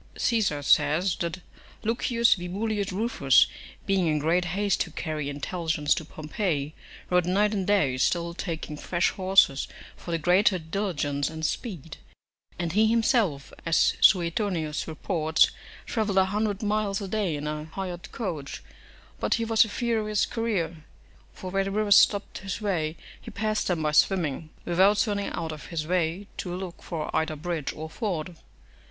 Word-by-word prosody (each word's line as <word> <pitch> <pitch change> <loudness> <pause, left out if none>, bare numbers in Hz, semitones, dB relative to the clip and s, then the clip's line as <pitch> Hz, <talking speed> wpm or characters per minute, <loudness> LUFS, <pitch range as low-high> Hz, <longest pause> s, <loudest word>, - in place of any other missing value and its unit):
Caesar 200 - +1
says, 155 +6 +3
that 170 +2 -3 0.4
Lucius 235 +1 +3
Vibullius 200 +3 -2
Rufus, 185 - +4 0.4
being 195 -3 +2
in 155 -1 +2
great 165 +4 +1
haste 195 +3 0
to - - -1
carry 155 -3 -4
intelligence 150 +1 -1
to - - -4
Pompey, 155 -1 -3 0.4
rode 180 -1 +3
night 205 +3 +2
and 195 -2 -2
day, 170 -11 +2
still 170 +5 +1
taking 165 -4 -5
fresh 175 +3 0
horses 185 -8 +3 0.3
for - - -11
the 165 - +1
greater 185 +4 +3
diligence 160 -5 -2
and 160 0 -4
speed; 165 - -4 0.6
and 170 -2 -2
he 215 +3 +4
himself, 220 - +1
as 165 -1 +3
Suetonius 170 -3 +2
reports, 160 -1 +2 0.3
travelled 210 -4 -1
a 190 - +6
hundred 205 +2 -1
miles 210 -1 0
a 200 - -5
day 195 -5 -1
in 145 0 -5
a 150 0 -3
hired 175 +1 -6
coach; 165 -11 -5 0.6
but - - +1
he 230 - -1
was 225 -1 +5
a - - -8
furious 215 -2 0
courier, 200 -8 -2 0.5
for 185 - -8
where 195 0 +1
the - - -2
rivers 205 0 +3
stopped 205 -1 +3
his 195 0 -5
way 170 -7 -1 0.2
he - - -9
passed 215 0 -1
them 170 -4 0
by 150 - +1
swimming, 155 -2 +2 0.2
without 190 +4 +4
turning 205 -1 0
out 165 -1 -4
of 155 -1 -9
his 160 -3 -3
way 175 +2 0
to 175 -1 -4
look 185 -2 -7
for 160 -3 -4
either 160 0 0
bridge 160 -1 -3
or 155 +1 -6
ford. 180 -2 -4
180 Hz, 160 wpm, -26 LUFS, 160-205 Hz, 0.6 s, a